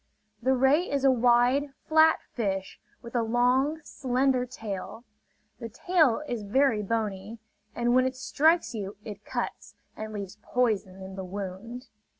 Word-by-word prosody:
The 260 +2 +2
ray 270 +7 +3
is 280 -1 -1
a 270 - +7
wide, 250 +3 +3
flat 315 0 +5 0.2
fish 195 -5 -3 0.2
with 235 - -10
a 240 - +3
long, 250 +6 +2
slender 255 -2 0
tail. 225 -2 -7 0.6
The 230 - -6
tail 305 - +2
is 240 -4 -3
very 225 +2 +2
bony; 210 0 -3 0.4
and 240 0 +1
when 255 +1 +4
it 260 - -4
strikes 315 +4 +2
you 205 -2 -5
it 210 -1 -8
cuts, - - -5 0.2
and 215 0 -6
leaves 205 -1 -7
poison 205 -7 -1
in 190 0 -8
the 190 - -4
wound. 200 +6 -7
240 Hz, 150 wpm, -27 LUFS, 210-265 Hz, 0.6 s, a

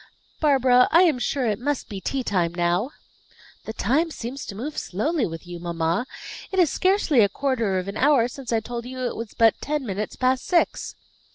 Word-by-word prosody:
"Barbara, 260 -4 +4
I 340 +3 +6
am 310 -8 +3
sure 255 +2 -1
it 210 -3 0
must 285 +2 -2
be 200 -3 -7
tea 270 +5 -2
time 175 -6 0
now." 175 +7 +1 0.8
"The 220 - -5
time 280 +11 +1
seems 260 -2 -6
to 200 - -6
move 280 +9 -5
slowly 255 - -1
with 165 0 -8
you, 175 0 -8
mamma. 170 +6 -1 0.4
It 380 - -3
is 350 -6 +4
scarcely 370 -8 +2
a 205 -2 +5
quarter 230 -5 0
of 185 +1 -3
an 200 - -5
hour 265 -3 +4
since 255 0 -8
I 225 -1 +2
told 235 +1 -6
you 255 0 -6
it - - -2
was 230 -2 -7
but 225 -1 +3
ten 295 -1 -2
minutes 205 0 -4
past 255 0 +1
six." 350 -2 +1
245 Hz, 200 wpm, -24 LUFS, 200-280 Hz, 0.8 s, I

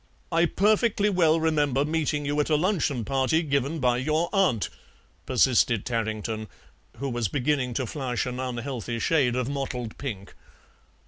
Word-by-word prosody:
"I 170 +1 +3
perfectly 210 +2 +2
well 165 -3 +3
remember 145 -4 +1
meeting 150 -2 -1
you 145 +1 -1
at 150 - +1
a 155 - +4
luncheon 155 - 0
party 135 +6 +1
given 140 +1 0
by 125 -4 +2
your 155 +6 0
aunt," 180 - +2 0.6
persisted 120 -3 +3
Tarrington, 110 -2 -2 0.5
who 140 +4 -3
was 120 -4 -1
beginning 130 +1 -1
to 130 - 0
flush 125 -1 -2
an 125 0 -4
unhealthy 125 -2 -4
shade 130 -1 +2
of 125 -1 -1
mottled 130 -5 -4
pink. 105 -9 -6
135 Hz, 145 wpm, -26 LUFS, 120-155 Hz, 0.6 s, a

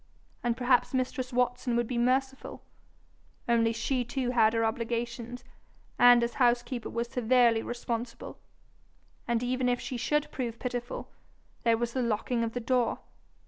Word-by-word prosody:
And 240 -1 -1
perhaps 250 +1 +2
mistress 255 0 -2
Watson 245 0 0
would 240 0 +1
be 235 +1 -2
merciful 265 +2 -1 0.8
only 230 -1 +3
she 245 +3 -1
too 245 +1 -2
had 225 -3 +4
her 230 0 +1
obligations, 235 +2 -3 0.6
and 245 -1 +7
as 235 - -1
housekeeper 240 0 +1
was 235 +1 -2
severely 240 -1 +3
responsible. 240 0 -5 0.9
And 235 0 0
even 250 0 0
if 245 0 +1
she 255 - -5
should 295 +5 0
prove 235 -3 -4
pitiful, 245 -1 -5 0.5
there 230 -1 +3
was 235 0 -2
the 260 - 0
locking 230 +1 0
of 225 -1 -3
the 245 - -2
door! 245 0 +1
240 Hz, 145 wpm, -29 LUFS, 235-250 Hz, 0.9 s, and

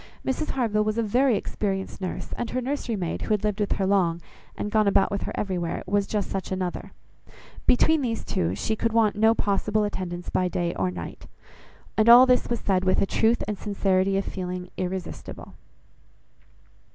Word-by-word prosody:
Mrs 285 +4 -1
Harville 220 -5 +1
was 215 +1 -1
a 230 - +2
very 245 +2 +3
experienced 195 -2 -3
nurse, 185 - -5
and 240 - -3
her 255 - -1
nursery 255 -2 -2
maid, 175 -4 -3
who 215 - +1
had 210 - -5
lived 210 -1 -1
with 205 - +1
her 195 - -1
long, 185 -4 +2 0.4
and 210 - -3
gone 215 -1 +3
about 195 0 +3
with 200 - -2
her - - -4
everywhere, 180 -4 -2
was 200 +1 0
just 210 -3 -2
such 195 -1 -4
another. 185 -1 -3 0.8
Between 315 +5 +4
these 230 -4 -2
two, 85 +2 -1
she 220 - -1
could 230 +1 -1
want 220 -2 +3
no 220 +2 +4
possible 210 +1 0
attendance 180 -4 -4
by 185 - +1
day 175 -1 -1
or 95 -1 -1
night. 90 -2 -8 0.7
And 215 +2 +5
all 245 +2 +10
this 250 -1 +2
was 235 - -1
said 190 -2 +1
with 185 0 +2
a - - +3
truth 225 +4 +2
and 210 -2 -3
sincerity 195 -2 +1
of 195 - -1
feeling 180 -1 -5
irresistible. 185 -1 -6
200 Hz, 190 wpm, -25 LUFS, 185-225 Hz, 0.8 s, all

